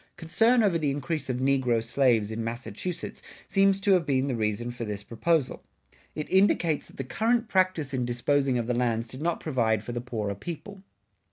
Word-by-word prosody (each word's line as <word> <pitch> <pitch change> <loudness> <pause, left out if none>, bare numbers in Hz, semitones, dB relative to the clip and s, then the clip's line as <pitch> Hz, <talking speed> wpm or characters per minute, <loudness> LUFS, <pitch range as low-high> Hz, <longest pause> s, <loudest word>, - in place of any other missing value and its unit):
[60:2] - - -46
Concern 225 +8 +3
over 185 -5 +2
the 150 -2 0
increase 145 0 -3
of 125 - 0
negro 130 -3 +2
slaves 115 -3 +2
in 110 +1 -3
Massachusetts 120 - -5 0.3
seems 195 0 +3
to 200 0 +1
have 185 -3 +5
been 135 -3 +1
the 130 - -1
reason 110 +2 -1
for 120 -1 -6
this 105 -2 -5
proposal. 145 +6 0 0.5
It 150 - -4
indicates 180 -5 +3
that - - -18
the 135 - -3
current 230 - 0
practice 185 - +1
in 130 -1 0
disposing 130 +2 +1
of 120 - -1
the 125 - 0
lands 120 -1 0
did 130 +4 -9
not 170 +1 0
provide 115 -8 0
for 120 - -6
the 120 0 -3
poorer 110 -5 -3
people. 175 - -8
135 Hz, 195 wpm, -27 LUFS, 120-170 Hz, 0.5 s, have